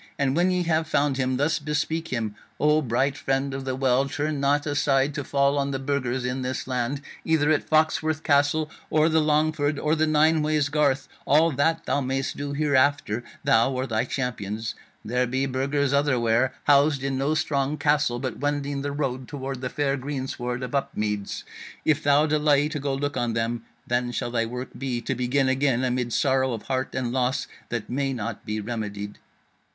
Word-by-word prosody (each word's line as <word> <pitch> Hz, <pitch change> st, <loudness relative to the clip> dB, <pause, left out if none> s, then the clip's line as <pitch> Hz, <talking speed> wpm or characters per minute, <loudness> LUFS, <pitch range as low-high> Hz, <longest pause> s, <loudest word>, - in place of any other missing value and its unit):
And 135 Hz, -1 st, +1 dB
when 175 Hz, +2 st, +3 dB
ye 180 Hz, -1 st, +1 dB
have 160 Hz, -1 st, +1 dB
found 145 Hz, -2 st, +1 dB
him 130 Hz, -1 st, 0 dB
thus 145 Hz, +5 st, +1 dB
bespeak 155 Hz, +2 st, -2 dB
him: 115 Hz, -6 st, -2 dB, 0.3 s
O 150 Hz, +1 st, +4 dB
bright 135 Hz, +2 st, 0 dB
Friend 135 Hz, -1 st, -1 dB
of 135 Hz, 0 st, -5 dB
the 130 Hz, -1 st, -1 dB
Well, 130 Hz, +1 st, +2 dB
turn 145 Hz, +1 st, -2 dB
not 145 Hz, +1 st, +2 dB
aside 145 Hz, -1 st, +2 dB
to 145 Hz, -1 st, -3 dB
fall 140 Hz, +1 st, +2 dB
on 140 Hz, 0 st, 0 dB
the 135 Hz, -, -1 dB
Burgers 130 Hz, -2 st, -1 dB
in 125 Hz, +1 st, -2 dB
this 130 Hz, +1 st, -3 dB
land, 130 Hz, +2 st, -2 dB, 0.2 s
either 155 Hz, -2 st, +2 dB
at 155 Hz, -, 0 dB
Foxworth 155 Hz, 0 st, +2 dB
Castle, 145 Hz, +2 st, +2 dB, 0.2 s
or 155 Hz, +1 st, +3 dB
the 160 Hz, 0 st, +3 dB
Longford, 150 Hz, -1 st, +1 dB
or 150 Hz, +1 st, +1 dB
the 155 Hz, 0 st, +2 dB
Nineways 155 Hz, -1 st, +3 dB
Garth: 145 Hz, -3 st, +2 dB, 0.2 s
all 155 Hz, +4 st, +5 dB
that 160 Hz, +4 st, +1 dB
thou 140 Hz, -, +1 dB
mayest 135 Hz, +1 st, -2 dB
do 145 Hz, 0 st, -4 dB
hereafter, 140 Hz, -5 st, +2 dB, 0.2 s
thou 115 Hz, +4 st, +4 dB
or 130 Hz, 0 st, -2 dB
thy 110 Hz, -3 st, 0 dB
champions. 110 Hz, -4 st, -3 dB, 0.3 s
There 125 Hz, +3 st, +1 dB
be 130 Hz, +2 st, 0 dB
Burgers 135 Hz, +1 st, 0 dB
otherwhere, 130 Hz, -3 st, +2 dB
housed 145 Hz, -1 st, +4 dB
in 135 Hz, -1 st, -1 dB
no 145 Hz, +3 st, +1 dB
strong 145 Hz, -2 st, 0 dB
castle, 145 Hz, -4 st, +2 dB
but 130 Hz, -1 st, -4 dB
wending 145 Hz, -1 st, -1 dB
the 145 Hz, +1 st, -2 dB
road 130 Hz, -3 st, -3 dB
toward 135 Hz, -3 st, -5 dB
the 125 Hz, -, -2 dB
fair 140 Hz, -1 st, 0 dB
greensward 130 Hz, -2 st, -4 dB
of 125 Hz, -, -5 dB
Upmeads. 105 Hz, -7 st, -2 dB, 0.4 s
If 155 Hz, -1 st, +3 dB
thou 145 Hz, +1 st, +4 dB
delay 150 Hz, -1 st, +3 dB
to 155 Hz, -2 st, -3 dB
go 140 Hz, -1 st, -1 dB
look 145 Hz, 0 st, -2 dB
on 120 Hz, -2 st, 0 dB
them, 115 Hz, 0 st, -2 dB, 0.2 s
then 120 Hz, -1 st, 0 dB
shall 120 Hz, -, -3 dB
thy 115 Hz, -1 st, 0 dB
work 125 Hz, +2 st, -5 dB
be 130 Hz, -3 st, -2 dB
to 135 Hz, -, -2 dB
begin 130 Hz, +2 st, +1 dB
again 130 Hz, -1 st, +2 dB
amid 125 Hz, -1 st, -1 dB
sorrow 130 Hz, 0 st, +2 dB
of 115 Hz, -, -5 dB
heart 130 Hz, -1 st, -2 dB
and 125 Hz, -2 st, -1 dB
loss 130 Hz, +1 st, 0 dB, 0.2 s
that 120 Hz, -3 st, -3 dB
may 135 Hz, +1 st, -1 dB
not 110 Hz, -5 st, -5 dB
be 105 Hz, 0 st, -2 dB
remedied.' 105 Hz, -2 st, -5 dB
135 Hz, 190 wpm, -25 LUFS, 125-145 Hz, 0.4 s, all